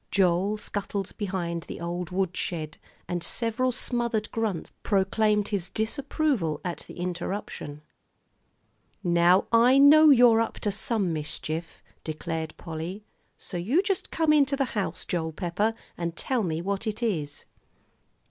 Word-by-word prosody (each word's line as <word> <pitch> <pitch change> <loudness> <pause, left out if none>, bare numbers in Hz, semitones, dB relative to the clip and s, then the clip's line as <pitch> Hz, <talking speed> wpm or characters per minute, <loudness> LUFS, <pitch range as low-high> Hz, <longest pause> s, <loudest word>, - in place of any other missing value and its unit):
Joel 190 +2 +2
scuttled 200 -2 -4
behind 180 -5 -2
the - - -6
old 175 0 -4
woodshed, 175 -4 -2 0.3
and 175 -1 -3
several 230 +6 0
smothered 235 -3 -1
grunts 215 -7 -2
proclaimed 210 +1 +2
his 195 -4 -2
disapproval 235 - -1
at 175 -1 -3
the - - -10
interruption. 175 -4 -5 1.2
"Now 175 +1 +4
I 240 +3 +6
know 305 +3 +8
you're 240 -4 +7
up 230 - -2
to 205 - 0
some 200 -3 0
mischief," 155 +2 -4 0.2
declared 160 0 -4
Polly, 170 +5 -6 0.3
"so 180 - -5
you 245 - +2
just 390 -2 -1
come 320 -2 +2
into 280 -2 +4
the 275 - +2
house, 185 -5 -2
Joel 160 -2 -2
Pepper, 200 +6 -1 0.2
and 170 -1 -3
tell 255 -3 0
me 165 -4 -2
what 200 +3 -2
it 215 +2 -3
is." 150 -10 -2
195 Hz, 135 wpm, -27 LUFS, 170-230 Hz, 1.2 s, know